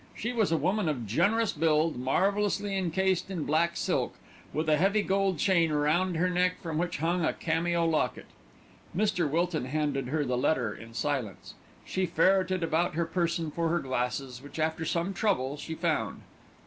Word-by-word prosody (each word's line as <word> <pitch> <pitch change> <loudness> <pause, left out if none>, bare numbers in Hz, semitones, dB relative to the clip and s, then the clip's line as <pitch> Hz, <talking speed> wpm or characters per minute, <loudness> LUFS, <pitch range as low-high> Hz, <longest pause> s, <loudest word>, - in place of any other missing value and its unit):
She 235 +3 -3
was 220 -7 +1
a 165 - +3
woman 190 0 +1
of 125 -6 -2
generous 215 - +2
build, 155 0 +2
marvellously 200 +9 0
encased 190 0 0
in 180 -5 -3
black 170 +4 +1
silk, - - -1 0.4
with 155 +1 -2
a 155 - +5
heavy 200 +5 +2
gold 195 -2 +1
chain 170 -1 +3
round 160 +4 +1
her 180 +3 +2
neck 180 0 +1
from 160 -2 -3
which 175 0 -1
hung 170 +4 0
a - - +1
cameo 170 +1 0
locket. 160 -2 0 0.7
Mr. 185 -6 +1
Wilton 165 -1 0
handed 140 -1 -1
her 150 +2 0
the 125 -1 0
letter 125 -6 +1
in 115 +3 -12
silence. 130 -9 -3 0.3
She 185 -1 -1
ferreted 185 +2 +2
about 165 +1 0
her 170 0 +1
person 165 -2 -1
for 165 +1 -1
her 170 - +2
glasses, 125 -1 -3
which 145 +3 -11
after 160 +1 -1
some 170 +4 -1
trouble 170 -9 0
she 160 +2 -6
found. 155 - -1
165 Hz, 175 wpm, -29 LUFS, 150-185 Hz, 0.7 s, a